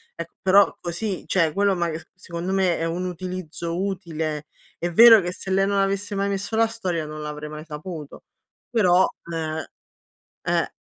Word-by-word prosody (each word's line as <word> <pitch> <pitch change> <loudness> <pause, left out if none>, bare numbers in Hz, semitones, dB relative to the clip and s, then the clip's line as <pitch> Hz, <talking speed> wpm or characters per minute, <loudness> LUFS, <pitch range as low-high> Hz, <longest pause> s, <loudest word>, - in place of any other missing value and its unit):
Ecco, - - -7
però 195 +2 +5
così 180 +3 -4
cioè 165 -4 +2
quello 200 +1 +2
ma 170 -1 0
c 160 +1 -6
secondo 180 0 -4
me 185 -3 +2
è 165 - -1
un 170 +2 -2
utilizzo 180 -1 -4
utile. 160 -6 -3 0.3
È 175 +1 -2
vero 225 +3 +9
che 175 - -3
se 190 - -8
lei 195 +1 +3
non 200 0 +1
avesse 195 +1 0
mai 200 0 0
messo 200 +2 -2
la 225 0 +5
storia 185 -8 -3
non 155 0 -7
l'avrei 150 0 -5
mai 150 0 -7
saputo, 155 -1 -8 0.5
però, 185 -5 +4 0.3
ehm, 160 -1 -2 0.8
eh - - 0
180 Hz, 170 wpm, -24 LUFS, 160-195 Hz, 0.8 s, vero